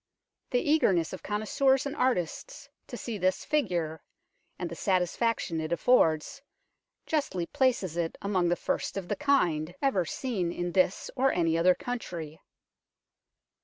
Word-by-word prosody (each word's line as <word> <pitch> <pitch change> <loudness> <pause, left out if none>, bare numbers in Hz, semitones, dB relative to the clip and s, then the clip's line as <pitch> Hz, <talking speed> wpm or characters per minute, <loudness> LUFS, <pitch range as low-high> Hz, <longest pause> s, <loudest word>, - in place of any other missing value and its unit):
The 245 +2 0
eagerness 190 - +3
of 185 - -7
connoisseurs 260 +6 +1
and 280 +1 -3
artists 255 - -1 0.2
to - - -7
see 225 -4 -5
this 185 +1 0
figure, 175 - -1 0.6
and 180 - -3
the 170 - -7
satisfaction 185 -1 0
it 155 - -4
affords, 170 - +2 0.6
justly 280 - -1
places 250 - 0
it 165 -1 -2
among 185 -3 +1
the 175 - +2
first - - -2
of 185 -3 -5
the - - 0
kind 175 - +1
ever 200 -11 +1
seen 190 -3 -2
in 175 0 -3
this 185 +1 +1
or 270 +1 +3
any 165 -2 +1
other 180 +2 +4
country." 170 -11 -6
185 Hz, 140 wpm, -29 LUFS, 170-255 Hz, 0.6 s, other